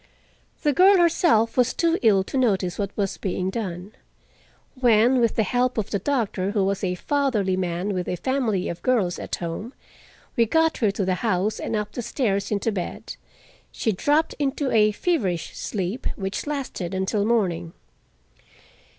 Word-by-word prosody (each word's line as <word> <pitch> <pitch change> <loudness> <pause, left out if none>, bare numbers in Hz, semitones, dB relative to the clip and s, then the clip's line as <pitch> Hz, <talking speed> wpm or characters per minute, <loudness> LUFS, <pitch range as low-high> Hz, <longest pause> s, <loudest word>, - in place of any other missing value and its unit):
The 295 -2 +3
girl 380 +6 +6
herself 325 -10 +3
was 250 -1 +2
too 335 +1 +1
ill 205 -5 +4
to 195 - -8
notice 200 -8 +1
what 200 -1 -1
was 200 -2 -1
being 185 0 -2
done. 190 -3 -5 0.9
When, 240 +1 +4
with 230 -2 +2
the 220 - +2
help 245 +4 0
of 215 - -2
the 200 - 0
doctor, 205 -6 -1
who 205 -1 +1
was 200 0 -1
a 180 -1 0
fatherly 225 -5 0
man 185 +2 -2
with 180 -1 -3
a - - -1
family 220 -2 -1
of 170 - -5
girls 210 -9 +1
at - - -3
home, 175 +9 -6 0.6
we 230 -3 +3
got 320 +5 +2
her 220 - +2
to 195 0 -2
the 185 - +1
house 210 -1 0
and 225 - -3
up 210 -1 -2
the 245 - -4
stairs 205 -5 -1
into 210 +2 0
bed, 185 -4 -5 0.6
she 220 - -1
dropped 295 - +1
into 280 -1 -1
a 215 -1 +4
feverish 205 - -1
sleep, 200 +4 -3
which 195 +6 -4
lasted 260 - -4
until 190 +2 0
morning. 180 -7 0
210 Hz, 165 wpm, -24 LUFS, 190-255 Hz, 0.9 s, girl